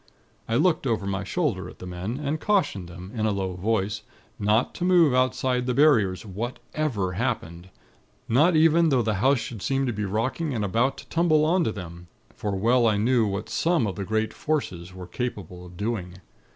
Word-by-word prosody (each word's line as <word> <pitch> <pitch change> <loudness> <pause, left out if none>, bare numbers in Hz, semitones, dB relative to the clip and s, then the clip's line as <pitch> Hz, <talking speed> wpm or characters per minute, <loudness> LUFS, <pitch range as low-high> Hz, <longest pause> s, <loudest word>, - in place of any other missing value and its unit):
"I 115 - +1
looked 160 0 +2
over 110 -4 0
my 100 -1 -2
shoulder 115 - -1
at - - -13
the - - -9
men, 90 +8 -5
and 150 +1 -2
cautioned 175 - 0
them, 90 +2 -10
in 110 -2 0
a - - +1
low 95 -2 -2
voice, 100 +2 -1 0.4
not 105 +3 +2
to - - -5
move 175 -6 +5
outside 130 0 +1
of 125 - -3
the 125 - 0
Barriers, 115 -11 +3
whatever 115 +1 -3
happened; 100 -6 -3 0.6
not 150 +9 +4
even 165 +1 +5
though 130 -4 +2
the 110 -1 0
house 135 +2 +4
should 115 -2 -6
seem 135 +4 0
to 120 - -1
be 105 0 -3
rocking 125 - -1
and 105 -3 -1
about 115 +7 +1
to - - -11
tumble 160 -2 +3
on 175 +3 +3
to - - 0
them; 85 -4 -9 0.3
for 105 -2 -3
well 115 +4 +3
I 105 -2 +2
knew 115 +1 +2
what 100 +2 -3
some 165 -7 +1
of 100 - -3
the 100 - -4
great 110 +2 -1
Forces 95 - -3
are 90 - -7
capable 90 -3 -5
of 90 0 -14
doing. 100 -4 -3
115 Hz, 200 wpm, -25 LUFS, 95-135 Hz, 0.6 s, move